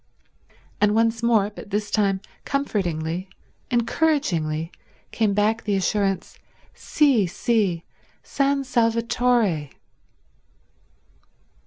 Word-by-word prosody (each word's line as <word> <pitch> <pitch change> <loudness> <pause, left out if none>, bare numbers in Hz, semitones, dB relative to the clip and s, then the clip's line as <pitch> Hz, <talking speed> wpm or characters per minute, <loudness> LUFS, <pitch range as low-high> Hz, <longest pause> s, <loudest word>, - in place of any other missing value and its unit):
And 210 0 +3
once 225 0 +2
more, 220 -3 +2
but 200 - -11
this 205 0 -2
time 195 -3 +1 0.2
comfortingly, 185 - -2 0.4
encouragingly, 225 - 0 0.4
came 215 -3 +1
back 215 +2 +1
the 205 -2 0
assurance, 195 0 -1 0.3
"Sì, 260 - +2
sì—San 235 +8 -1
Salvatore." 230 - +1
210 Hz, 75 wpm, -23 LUFS, 190-235 Hz, 0.4 s, And